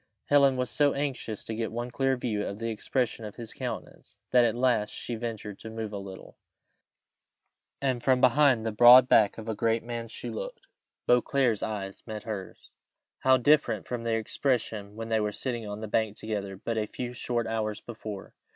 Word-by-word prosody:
Helen 140 -2 +5
was 125 -2 -1
so 145 -1 +3
anxious 135 -6 -3
to 110 - -4
get 110 0 -3
one 120 +2 -4
clear 135 +1 +1
view 110 -4 -2
of 100 - -4
the 115 +1 -3
expression 115 +1 -2
of 105 -1 -7
his 115 -2 -8
countenance, - - -7
that 125 -1 +6
at 115 - +1
last 120 -4 +2
she 120 - -6
ventured 110 -3 -5
to 110 - -8
move 110 -1 -5
a 100 - -3
little, 95 -1 -10 1.4
and 130 -3 0
from 130 0 +3
behind 130 -2 +4
the 110 - 0
broad 120 +3 +9
back 105 -5 +4
of 110 0 -8
a 110 - -1
great 115 +2 0
man 120 -1 -5
she 115 - -6
looked: - - -6 0.4
Beauclerc's 125 -2 +2
eyes 100 -3 -4
met 110 -2 -6
hers. 105 -4 -7 0.5
How 130 0 +5
different 145 +4 +3
from 125 -1 -4
their 115 -1 +1
expression 110 -3 -2
when 115 0 -6
they 110 -1 +2
were 105 -1 0
sitting 120 -1 -4
on 105 +1 -6
the 110 - -4
bank 110 0 0
together 100 -3 -4
but 110 +3 -2
a 105 - -2
few 125 +2 -5
short 120 -1 -2
hours 110 -2 -2
before! 110 -4 -8
115 Hz, 190 wpm, -28 LUFS, 110-125 Hz, 1.4 s, broad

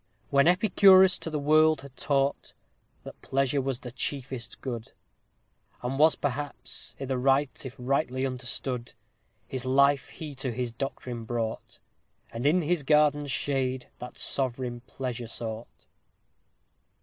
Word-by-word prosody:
_When 140 +2 +5
Epicurus 190 0 +6
to - - -4
the 155 - -2
world 155 +1 +4
had 140 -1 -13
taught, 140 0 -1 0.5
That - - -11
pleasure 135 +1 0
was 135 -1 -3
the 125 - -7
chiefest 130 -2 -5
good; 120 -4 -6 0.9
And 130 +3 -2
was 155 +1 +6
perhaps 140 -1 -5
i' 135 - -4
th' 135 - -5
right, 135 +2 +1
if 130 -1 -7
rightly 130 0 0
understood, 125 -1 -3 0.5
His 130 -2 -5
life 140 +1 +3
he 155 -3 -8
to 135 -1 -3
his 120 0 -3
doctrine 120 -1 -5
brought 115 -1 -4 0.5
And 120 +4 -1
in 175 +4 +3
his 170 +1 +1
garden's 145 0 +3
shade 130 -2 -1
that 125 0 -9
sovereign 125 -2 0
pleasure 125 -3 -5
sought. 110 0 -7
135 Hz, 135 wpm, -28 LUFS, 125-145 Hz, 0.9 s, Epicurus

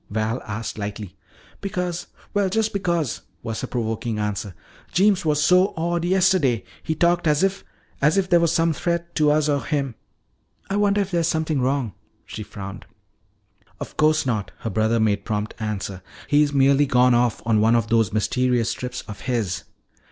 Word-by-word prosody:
Val 110 +3 -1
asked 110 +1 -5
lightly. 100 -2 -5 0.5
"Because 180 -3 -3 0.3
well, 200 -2 +2
just 220 +3 0
because," 170 - -1 0.2
was 115 -1 -4
her - - -3
provoking 115 -1 -2
answer. 105 -2 -3 0.4
"Jeems 195 0 +3
was 150 -1 +2
so 180 +5 +4
odd 170 +1 -1
yesterday. 180 - +3 0.2
He 160 - -2
talked 175 +1 +2
as 150 +3 +3
if 195 0 0 0.4
as 150 +6 +3
if 195 -1 +2
there 175 -2 +5
were 170 - +3
some 165 0 +2
threat 170 +2 -2
to 150 -2 +3
us 150 0 +3
or 140 -3 +1
him. 140 0 -1 0.8
I - - +1
wonder 205 0 +3
if 195 -1 -3
there 170 -2 +1
is 165 - +1
something 160 -3 0
wrong." 130 -4 0 0.3
She - - -7
frowned. 100 -1 -8 0.9
"Of - - -7
course 155 0 +3
not!" 105 -7 -1
her 115 - -3
brother 110 +3 +1
made 105 -2 +1
prompt 105 0 -3
answer. 100 -3 -4 0.3
"He's 145 0 +3
merely 140 +1 +4
gone 125 -1 +4
off 120 -1 +1
on 110 -2 +3
one 115 +2 +4
of 115 -2 +1
those 115 -1 +3
mysterious 120 +2 +1
trips 125 -1 -5
of 105 - -9
his." 115 -8 -2
135 Hz, 175 wpm, -23 LUFS, 110-170 Hz, 0.9 s, there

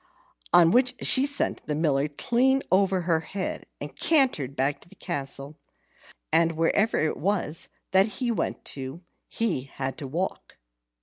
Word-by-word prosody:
On 170 -1 +6
which 250 +2 +3
she 270 +2 +4
sent 285 - 0
the 150 - -1
Miller 145 -2 +1
clean 255 - +1
over 190 -1 +3
her 170 -2 +1
head, 185 +4 -5
and - - -7
cantered 255 - +2
back 135 +2 0
to - - -18
the - - -16
castle; 140 +1 -4 0.7
and 165 0 +3
wherever 200 +7 +2
it 155 - 0
was 175 -3 -1 0.2
that 190 +2 +5
he 245 -2 0
went 230 - -3
to, 135 +5 -7 0.3
he 215 - -1
had 135 0 -5
to 140 - -5
walk. 170 +8 -4
170 Hz, 150 wpm, -26 LUFS, 145-215 Hz, 0.7 s, On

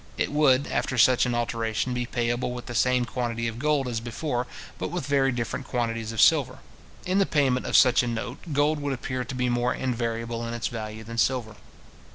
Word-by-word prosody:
It - - 0
would, 145 -2 +4
after 130 - -2
such 125 +1 +5
an 120 - -1
alteration, 115 +1 -1
be 125 -1 -2
payable 120 0 -1
with 125 0 -7
the 120 - -6
same 125 +1 +2
quantity 115 -2 -2
of 115 0 -5
gold 145 -2 +1
as 120 -2 -2
before, 120 +2 -3 0.3
but - - -2
with 175 -5 -4
very 135 -1 +2
different 120 +2 -4
quantities 115 -2 -2
of 115 - -5
silver. 135 -5 +4 0.5
In 185 +2 +1
the 195 - +3
payment 135 -4 +1
of - - +4
such 125 -2 +6
a 125 - -2
note, 120 +2 -4
gold 145 +2 +2
would 145 -1 -2
appear 130 0 -3
to 125 +2 -7
be 125 0 0
more 120 0 +1
invariable 115 -2 -2
in 115 - -4
its 120 - -2
value 110 -1 -6
than 115 +1 -5
silver. 120 -5 0
125 Hz, 210 wpm, -26 LUFS, 115-130 Hz, 0.5 s, such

